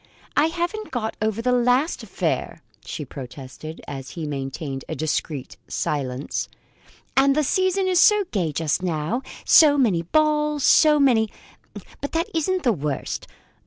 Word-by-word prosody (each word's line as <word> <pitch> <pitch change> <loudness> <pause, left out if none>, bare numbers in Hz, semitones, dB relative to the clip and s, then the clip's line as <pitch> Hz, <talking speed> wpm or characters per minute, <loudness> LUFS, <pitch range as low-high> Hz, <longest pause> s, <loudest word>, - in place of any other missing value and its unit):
I 300 - +4
haven't 350 +6 -3
got 230 -4 -3
over 220 +1 -1
the 250 - +2
last 250 +5 +2
affair," - - -3 0.2
she 150 - -6
protested, 135 +4 -9
as 135 -2 -6
he 165 - -3
maintained 135 -1 -4
a - - -3
discreet 150 -3 -3
silence, 135 -2 -3 0.7
"and 275 +1 +4
the 305 - +2
season 375 +5 +1
is 365 -2 +3
so 420 +1 +6
gay 175 -7 0
just 155 +3 -1
now 175 +6 -1 0.2
so 295 -3 +7
many 210 -11 +2
balls, 300 - +1
so 300 +2 +6
many 235 -6 +4 0.7
But 285 - -4
that 335 +5 0
isn't 360 +3 0
the 240 -4 +3
worst. 145 -5 -4
235 Hz, 145 wpm, -23 LUFS, -, 0.7 s, so